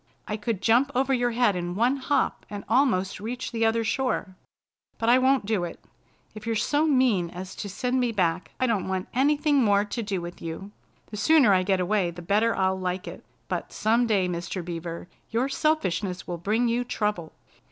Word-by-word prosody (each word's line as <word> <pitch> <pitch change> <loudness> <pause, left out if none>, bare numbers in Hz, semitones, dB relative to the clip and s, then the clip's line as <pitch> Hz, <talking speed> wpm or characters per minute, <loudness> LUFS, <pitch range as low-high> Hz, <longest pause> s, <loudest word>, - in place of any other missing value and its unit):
I 210 - -2
could 210 -2 -3
jump 245 +5 +4
over 265 +1 +2
your 245 -1 +2
head 235 -4 +2
in 175 0 -3
one 245 +6 +2
hop 280 +2 0
and 205 -1 -6
almost 220 -8 +2
reach 245 +5 -5
the 230 -1 -1
other 225 +1 +1
shore. 225 -5 -1 0.6
But 230 - 0
I 250 +2 +6
won't 260 -3 +3
do 210 -4 0
it! 170 - -6 0.5
If 215 +1 -10
you're 225 - 0
so 290 +7 +1
mean 250 - +2
as 185 +2 -8
to 205 - -5
send 250 +6 -1
me 245 -2 +1
back, 180 -4 0
I 255 - +2
don't 220 -7 0
want 190 -1 -3
anything 290 +3 +2
more 205 -1 +3
to 230 +3 -4
do 200 -4 -2
with 175 0 -8
you. 165 +5 -6 0.4
The 210 - -6
sooner 255 -1 +5
I 185 - +4
get 190 0 +1
away 185 0 +1
the 175 +1 -9
better 215 +5 +2
I'll 190 0 +1
like 185 0 -3
it. - - -8 0.2
But - - -4
some 230 +3 +2
day, 200 -5 +2
Mr. 175 0 -4
Beaver, 170 0 -6 0.2
your 235 +4 0
selfishness 205 - -1
will 175 -1 -5
bring 220 +7 +1
you 235 +1 +1
trouble. 210 -8 -2
210 Hz, 200 wpm, -26 LUFS, 185-245 Hz, 0.6 s, I